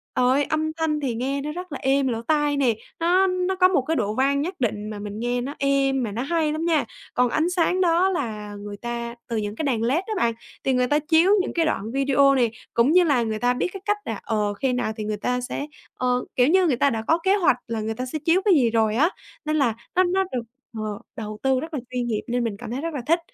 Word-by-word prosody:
Trời 250 Hz, 0 st, +3 dB
ơi, 280 Hz, +2 st, +3 dB
âm 315 Hz, +1 st, -1 dB
thanh 315 Hz, -2 st, -1 dB
thì 255 Hz, -5 st, -2 dB
nghe 275 Hz, +4 st, -2 dB
nó 300 Hz, +1 st, -4 dB
rất 360 Hz, 0 st, -7 dB
là 275 Hz, -, -5 dB
êm 270 Hz, 0 st, +2 dB
lỗ 230 Hz, -2 st, -2 dB
tai 295 Hz, +2 st, +1 dB
nè, 245 Hz, -5 st, +2 dB, 0.2 s
nó 365 Hz, +3 st, +3 dB
nó 365 Hz, +1 st, 0 dB
có 365 Hz, 0 st, +5 dB
một 365 Hz, -7 st, +2 dB
cái 320 Hz, +5 st, -1 dB
độ 210 Hz, -3 st, 0 dB
vang 280 Hz, +2 st, +2 dB
nhất 360 Hz, +5 st, -2 dB
định 215 Hz, -3 st, -1 dB
mà 210 Hz, -1 st, -6 dB
mình 205 Hz, +1 st, -6 dB
nghe 245 Hz, +1 st, -1 dB
nó 280 Hz, +4 st, -5 dB
êm 275 Hz, -2 st, +2 dB
mà 215 Hz, -, -3 dB
nó 230 Hz, +4 st, -3 dB
hay 315 Hz, +1 st, 0 dB
lắm 315 Hz, +2 st, -2 dB
nha, 320 Hz, -6 st, +2 dB, 0.3 s
còn 250 Hz, -1 st, +2 dB
ánh 320 Hz, +7 st, +1 dB
sáng 360 Hz, +1 st, +1 dB
đó 350 Hz, +2 st, +3 dB
là 215 Hz, -, -4 dB
người 205 Hz, 0 st, -8 dB
ta 235 Hz, 0 st, -5 dB
từ 230 Hz, -, -2 dB
những 210 Hz, 0 st, -3 dB
cái 315 Hz, -, -3 dB
đèn 240 Hz, -6 st, 0 dB
led 285 Hz, +10 st, +1 dB
á 440 Hz, -, -3 dB
bạn, 230 Hz, -6 st, +2 dB, 0.3 s
thì 265 Hz, -, +1 dB
người 250 Hz, 0 st, +2 dB
ta 295 Hz, +2 st, +2 dB
chiếu 325 Hz, +5 st, +3 dB
những -, -, -4 dB
cái 330 Hz, -1 st, +2 dB
đoạn 220 Hz, -7 st, -2 dB
video 275 Hz, 0 st, +3 dB
này, 240 Hz, -4 st, +2 dB, 0.2 s
cũng 235 Hz, +6 st, +3 dB
như 360 Hz, +1 st, +6 dB
là 275 Hz, -8 st, +2 dB
người 220 Hz, -1 st, -2 dB
ta 245 Hz, 0 st, +2 dB
biết 250 Hz, -, -1 dB
cái 390 Hz, -, -7 dB
cách 415 Hz, 0 st, +1 dB
là, 225 Hz, -3 st, -4 dB
ờ, 210 Hz, -2 st, 0 dB
khi 250 Hz, +5 st, -1 dB
nào 245 Hz, -3 st, -1 dB
thì 215 Hz, -, -3 dB
người 210 Hz, 0 st, -2 dB
ta 250 Hz, +3 st, -1 dB
sẽ 285 Hz, +3 st, -4 dB, 0.3 s
ờ, 250 Hz, 0 st, 0 dB
kiểu 250 Hz, +1 st, +4 dB
như, 370 Hz, +2 st, +4 dB
người 275 Hz, -, +2 dB
ta 280 Hz, +3 st, +3 dB
đã 225 Hz, -3 st, -2 dB
có 325 Hz, -, +4 dB
kế 385 Hz, +1 st, +4 dB
hoạch 340 Hz, -10 st, +3 dB
là 225 Hz, -2 st, -3 dB
người 220 Hz, +1 st, -2 dB
ta 255 Hz, -, -3 dB
sẽ 305 Hz, +5 st, -4 dB
chiếu 345 Hz, +3 st, +4 dB
cái 400 Hz, -, +6 dB
gì 245 Hz, -5 st, +4 dB
rồi 220 Hz, -1 st, +2 dB
á, 315 Hz, +8 st, +4 dB, 0.4 s
nên 305 Hz, 0 st, 0 dB
là 260 Hz, -7 st, +2 dB, 0.2 s
nó 370 Hz, -, +5 dB
nó 370 Hz, +2 st, +1 dB
được, 245 Hz, -2 st, -2 dB, 0.3 s
ờ, 215 Hz, -1 st, -4 dB, 0.2 s
đầu 215 Hz, -1 st, -6 dB
tư 265 Hz, -1 st, +3 dB
rất 320 Hz, +2 st, -7 dB
là 285 Hz, -, -1 dB
chuyên 250 Hz, -1 st, -2 dB
nghiệp 215 Hz, -2 st, -1 dB
nên 245 Hz, 0 st, 0 dB
mình 210 Hz, -3 st, -3 dB
cảm 235 Hz, 0 st, -8 dB
thấy 265 Hz, +3 st, -3 dB
rất 330 Hz, -1 st, -3 dB
là 270 Hz, -, -3 dB
thích. 335 Hz, +2 st, +4 dB
265 Hz, 280 wpm, -24 LUFS, 230-320 Hz, 0.4 s, như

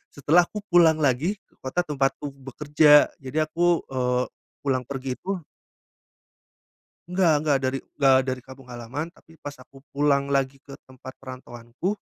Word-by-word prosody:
setelah 160 Hz, +5 st, +4 dB
aku 210 Hz, -1 st, -7 dB
pulang 170 Hz, -2 st, +6 dB
lagi 150 Hz, +6 st, +1 dB
ke -, -, -34 dB
kota 135 Hz, +7 st, -1 dB
tempatku 145 Hz, -1 st, -1 dB
bekerja 145 Hz, +3 st, +4 dB
jadi 140 Hz, +4 st, -1 dB
aku, 175 Hz, 0 st, +2 dB
eee, 125 Hz, -1 st, 0 dB, 0.4 s
pulang 130 Hz, -2 st, 0 dB
pergi 135 Hz, -2 st, -4 dB
itu 190 Hz, -2 st, -4 dB, 1.7 s
Enggak 180 Hz, -2 st, +3 dB
enggak 145 Hz, -3 st, +2 dB
dari 130 Hz, 0 st, -1 dB, 0.2 s
da 135 Hz, -2 st, +5 dB
dari 130 Hz, -1 st, -3 dB
kampung 130 Hz, 0 st, -14 dB
halaman, 125 Hz, +7 st, -6 dB
tapi 165 Hz, -2 st, -21 dB
pas 145 Hz, -, -6 dB
aku 135 Hz, +1 st, -17 dB
pulang 140 Hz, -1 st, +1 dB
lagi 135 Hz, -1 st, -1 dB
ke 140 Hz, -, -12 dB
tempat 130 Hz, 0 st, -12 dB
perantauanku, 130 Hz, -, -6 dB
140 Hz, 145 wpm, -24 LUFS, 130-155 Hz, 1.7 s, pulang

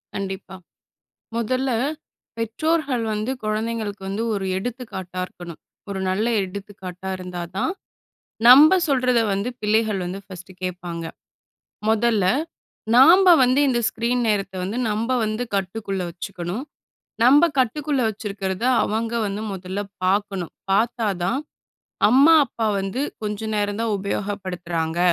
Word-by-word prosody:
கண்டிப்பா. 195 Hz, -1 st, -5 dB, 0.8 s
முதல்ல, 255 Hz, +3 st, 0 dB, 0.7 s
பெற்றோர்கள் 260 Hz, +2 st, 0 dB
வந்து 215 Hz, +3 st, -2 dB
குழந்தைங்களுக்கு 215 Hz, -1 st, -2 dB
வந்து 200 Hz, +3 st, -2 dB
ஒரு 195 Hz, -2 st, -2 dB
எடுத்துக்காட்டா 190 Hz, -5 st, -5 dB
இருக்கணும். 175 Hz, -3 st, -11 dB, 0.3 s
ஒரு 195 Hz, -1 st, -3 dB
நல்ல 195 Hz, +4 st, 0 dB, 0.2 s
எடுத்துக்காட்டா 190 Hz, -1 st, -7 dB
இருந்தா 180 Hz, -1 st, -6 dB
தான் 330 Hz, -, 0 dB, 0.8 s
நம்ப 295 Hz, +8 st, +9 dB
சொல்றத 255 Hz, -4 st, +2 dB
வந்து 200 Hz, +4 st, -1 dB
பிள்ளைகள் 215 Hz, -1 st, +1 dB
வந்து 180 Hz, +2 st, -4 dB
ஃபர்ஸ்ட்டு 185 Hz, -1 st, -11 dB
கேப்பாங்க. 175 Hz, -2 st, -4 dB, 0.9 s
மொதல்ல, 220 Hz, -2 st, +2 dB, 0.7 s
நாம்ப 350 Hz, +9 st, +8 dB
வந்து 255 Hz, +2 st, +3 dB
இந்த 245 Hz, -2 st, +2 dB
ஸ்க்ரீன் 235 Hz, +2 st, -1 dB
நேரத்த 200 Hz, -2 st, 0 dB
வந்து 200 Hz, +6 st, -3 dB
நம்ப 220 Hz, +4 st, -1 dB
வந்து 215 Hz, +3 st, -2 dB
கட்டுக்குள்ள 195 Hz, 0 st, -2 dB
வச்சுக்கணும். 180 Hz, +4 st, -5 dB, 0.6 s
நம்ப 285 Hz, +7 st, +7 dB
கட்டுக்குள்ள 275 Hz, +3 st, 0 dB
வச்சிருக்கிறத 195 Hz, -2 st, -4 dB, 0.2 s
அவங்க 225 Hz, +2 st, -2 dB
வந்து 200 Hz, +1 st, -4 dB
முதல்ல 190 Hz, +1 st, -5 dB, 0.3 s
பார்க்கணும். 195 Hz, -2 st, 0 dB, 0.2 s
பார்த்தா 225 Hz, +3 st, +1 dB, 0.2 s
தான் 260 Hz, +9 st, 0 dB, 0.7 s
"அம்மா, 275 Hz, +7 st, +7 dB
அப்பா 230 Hz, -2 st, -3 dB
வந்து 195 Hz, +7 st, -3 dB, 0.2 s
கொஞ்சம் 215 Hz, +1 st, -3 dB
நேரம் 205 Hz, 0 st, -1 dB
தான், 225 Hz, -2 st, 0 dB
உபயோகப்படுத்துறாங்க. 180 Hz, -4 st, -3 dB
210 Hz, 115 wpm, -22 LUFS, 190-235 Hz, 0.9 s, நம்ப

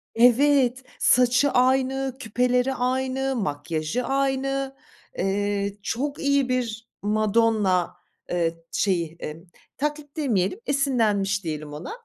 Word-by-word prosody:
Evet, 255 Hz, +1 st, +4 dB, 0.2 s
saçı 250 Hz, +3 st, +4 dB
aynı, 265 Hz, +1 st, +2 dB
küpeleri 250 Hz, +2 st, +1 dB
aynı, 260 Hz, +1 st, -1 dB
makyajı 155 Hz, -, -2 dB
aynı. 270 Hz, 0 st, -1 dB, 0.4 s
Eee, 200 Hz, 0 st, -1 dB
çok 280 Hz, +7 st, -2 dB
iyi 280 Hz, -2 st, +2 dB
bir 235 Hz, -3 st, -2 dB
Madonna, 210 Hz, -3 st, +2 dB, 0.4 s
eee, 165 Hz, -1 st, -1 dB
şeyi, 170 Hz, -4 st, 0 dB
eee, 155 Hz, +3 st, -6 dB, 0.3 s
taklit 295 Hz, 0 st, -4 dB
demeyelim, 235 Hz, -, 0 dB
esinlenmiş 215 Hz, -9 st, +1 dB
diyelim 155 Hz, -2 st, -5 dB
ona. 150 Hz, -, -7 dB
245 Hz, 100 wpm, -24 LUFS, 195-270 Hz, 0.4 s, Evet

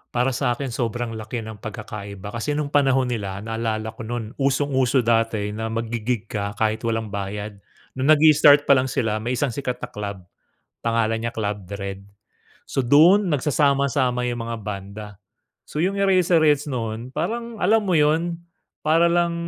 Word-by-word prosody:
Para 125 Hz, +2 st, +2 dB
sa'kin, 125 Hz, +1 st, -1 dB
sobrang 120 Hz, 0 st, -2 dB
laki 110 Hz, +1 st, -5 dB
ng 110 Hz, -1 st, -9 dB
pagkakaiba. 100 Hz, -1 st, -7 dB
Kasi 120 Hz, +6 st, -2 dB
nung 145 Hz, -1 st, -2 dB
panahon 135 Hz, -3 st, +2 dB
nila, 100 Hz, -3 st, -4 dB
naalala 110 Hz, -1 st, -3 dB
ko 110 Hz, -, -26 dB
nu'n 115 Hz, -1 st, -4 dB
usong-uso 135 Hz, -2 st, +2 dB
dati 115 Hz, -3 st, +1 dB
na 110 Hz, +2 st, -4 dB
maggi-gig 115 Hz, 0 st, -3 dB
ka 100 Hz, -1 st, -3 dB
kahit 110 Hz, +1 st, 0 dB
walang 110 Hz, -2 st, -2 dB
bayad. 100 Hz, +1 st, -5 dB, 0.4 s
Nung 130 Hz, -, +1 dB
nag-i-start 150 Hz, -1 st, +6 dB
pa -, -, +2 dB
lang 130 Hz, -, 0 dB
sila, 110 Hz, -4 st, -1 dB
may 120 Hz, +3 st, -2 dB
isang 135 Hz, +1 st, 0 dB
sikat 125 Hz, 0 st, -3 dB
na -, -, -5 dB
club, 100 Hz, -2 st, -6 dB, 0.6 s
pangalan 115 Hz, -1 st, 0 dB
niya 115 Hz, +1 st, -4 dB
Club 105 Hz, -3 st, -3 dB
Dredd. 100 Hz, 0 st, -6 dB, 0.6 s
So, -, -, -4 dB
du'n 160 Hz, +11 st, +5 dB
nagsasama-sama 140 Hz, -4 st, +1 dB
yung 120 Hz, -, -4 dB
mga 115 Hz, 0 st, -3 dB
banda. 100 Hz, +1 st, -6 dB, 0.6 s
So, 150 Hz, -, -2 dB
yung 195 Hz, +2 st, 0 dB
Eraserheads 170 Hz, -6 st, +3 dB
no'n 115 Hz, 0 st, -4 dB
parang 230 Hz, -, -3 dB
alam 215 Hz, +4 st, +3 dB
mo 195 Hz, -, -1 dB
yun, 165 Hz, +3 st, +1 dB, 0.4 s
para 165 Hz, +2 st, +3 dB
lang 170 Hz, 0 st, +2 dB
120 Hz, 155 wpm, -23 LUFS, 110-145 Hz, 0.6 s, nag-i-start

